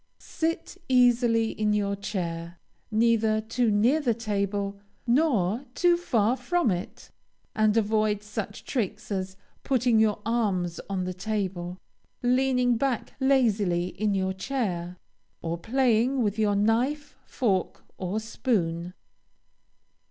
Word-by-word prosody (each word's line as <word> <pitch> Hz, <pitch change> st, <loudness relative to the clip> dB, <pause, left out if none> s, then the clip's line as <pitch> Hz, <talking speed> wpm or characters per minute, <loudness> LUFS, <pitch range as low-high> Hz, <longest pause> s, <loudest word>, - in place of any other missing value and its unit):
Sit 330 Hz, +1 st, -3 dB
easily 240 Hz, -3 st, +4 dB
in 210 Hz, -1 st, 0 dB
your 200 Hz, -1 st, 0 dB
chair, 170 Hz, -4 st, -4 dB, 0.3 s
neither 220 Hz, -1 st, +2 dB
too 225 Hz, +2 st, 0 dB
near 225 Hz, +9 st, +3 dB
the 240 Hz, -6 st, +1 dB
table, 200 Hz, -2 st, -2 dB, 0.3 s
nor 240 Hz, -, +2 dB
too 350 Hz, -1 st, +4 dB
far 240 Hz, -9 st, +1 dB
from 265 Hz, -, +1 dB
it, 180 Hz, 0 st, -6 dB, 0.4 s
and 215 Hz, 0 st, +3 dB
avoid 215 Hz, -1 st, +1 dB
such 210 Hz, -1 st, -6 dB
tricks 215 Hz, -3 st, -3 dB
as 190 Hz, -1 st, -3 dB, 0.3 s
putting 245 Hz, -4 st, +2 dB
your 215 Hz, -2 st, +2 dB
arms 195 Hz, -7 st, 0 dB
on 190 Hz, -2 st, -1 dB
the 185 Hz, 0 st, -3 dB
table, 185 Hz, -3 st, -3 dB, 0.5 s
leaning 250 Hz, -1 st, +2 dB
back 260 Hz, -1 st, -1 dB
lazily 210 Hz, -10 st, +2 dB
in 205 Hz, +1 st, -1 dB
your 190 Hz, 0 st, 0 dB
chair, 185 Hz, -6 st, -3 dB, 0.5 s
or 165 Hz, 0 st, -1 dB
playing 245 Hz, +3 st, +2 dB
with 210 Hz, 0 st, -1 dB
your 210 Hz, -2 st, +2 dB
knife, 245 Hz, +8 st, 0 dB
fork, 195 Hz, -8 st, -1 dB, 0.2 s
or 190 Hz, +3 st, -2 dB
spoon. 180 Hz, -7 st, -2 dB
215 Hz, 120 wpm, -27 LUFS, 195-245 Hz, 0.5 s, easily